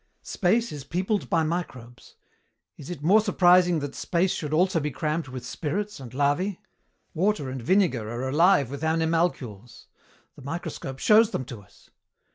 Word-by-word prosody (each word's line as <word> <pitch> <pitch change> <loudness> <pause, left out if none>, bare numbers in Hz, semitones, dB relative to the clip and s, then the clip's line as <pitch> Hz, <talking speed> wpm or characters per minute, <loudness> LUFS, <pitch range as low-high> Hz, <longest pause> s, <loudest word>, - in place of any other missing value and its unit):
Space 225 +6 0
is 145 -3 -7
peopled 185 +8 -2
by 165 -1 +2
microbes. 130 -8 -6 0.6
Is 145 - -11
it 165 -5 -7
more 200 +7 +5
surprising 180 -4 +4
that 145 -1 -5
space 180 +1 0
should 150 -2 -4
also 175 +2 +2
be 150 0 -2
crammed 155 +3 -2
with 130 -1 -8
spirits 200 +6 -4
and 125 -4 -9
larvæ? 145 +8 0 0.6
Water 165 -6 0
and 130 -1 -5
vinegar 135 - +1
are 120 +3 -4
alive 145 -2 +3
with 140 +2 -6
animalcules. 160 - -1 0.5
The - - -14
microscope 140 -2 -6
shows 215 +8 +5
them 130 - -4
to 120 -4 -9
us. 95 - -23
160 Hz, 155 wpm, -25 LUFS, 135-180 Hz, 0.6 s, more